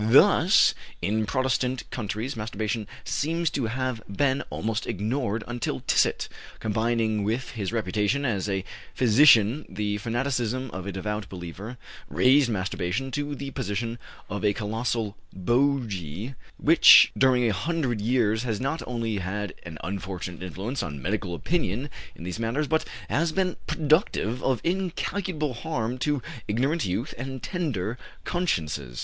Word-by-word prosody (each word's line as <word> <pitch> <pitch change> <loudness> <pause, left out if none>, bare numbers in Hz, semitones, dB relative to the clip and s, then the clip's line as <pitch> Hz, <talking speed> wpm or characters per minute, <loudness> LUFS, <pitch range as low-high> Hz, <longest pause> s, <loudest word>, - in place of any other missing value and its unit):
Thus - - +6 0.3
in 105 +3 +1
Protestant 130 0 0
countries 115 +4 -3
masturbation 110 0 -3 0.2
seems 165 +1 0
to 130 -5 -1
have 130 -1 -2
been 130 +7 +1
almost 110 0 -2
ignored 110 +2 -1
until 120 - -3
Tissot, - - +2 0.3
combining 110 -1 +1
with 115 +5 -1
his 105 -5 -3
reputation 110 +5 0
as 105 -5 0
a 95 -1 -1 0.3
physician 120 +1 +6
the 105 +1 -2
fanaticism 125 +1 -1
of 95 +1 -6
a - - -2
devout 105 +2 -3
believer, 95 +6 -7 0.3
raised 125 - +5
masturbation 100 +4 -2
to 145 0 -2
the 140 0 -6
position 115 +2 -3 0.3
of 100 +1 -4
a 105 -1 +3
colossal 110 0 -2 0.2
bogy 115 - 0 0.2
which - - +8
during 130 -2 +4
a 110 - +2
hundred 130 - -1
years 110 -1 +2
has 115 -4 -2
not 135 +5 -1
only 115 -4 -1
had 100 +2 -3
an 85 -3 -8
unfortunate 90 -2 -5
influence 100 +8 -3
on 75 -4 -5
medical 95 +3 -2
opinion 145 - -1 0.2
in - - -10
these 90 +4 -4
matters, 115 +7 0
but 160 +2 +1 0.2
has 165 +2 +1
been 185 +1 0
productive 150 - +1
of 130 -3 +1
incalculable 180 -3 -1
harm 125 -3 -3
to 145 -1 0 0.2
ignorant 135 +10 +1
youth 105 +10 -2
and 130 -1 -5
tender 125 - -2 0.2
consciences. 75 - -1
115 Hz, 135 wpm, -26 LUFS, 100-135 Hz, 0.3 s, which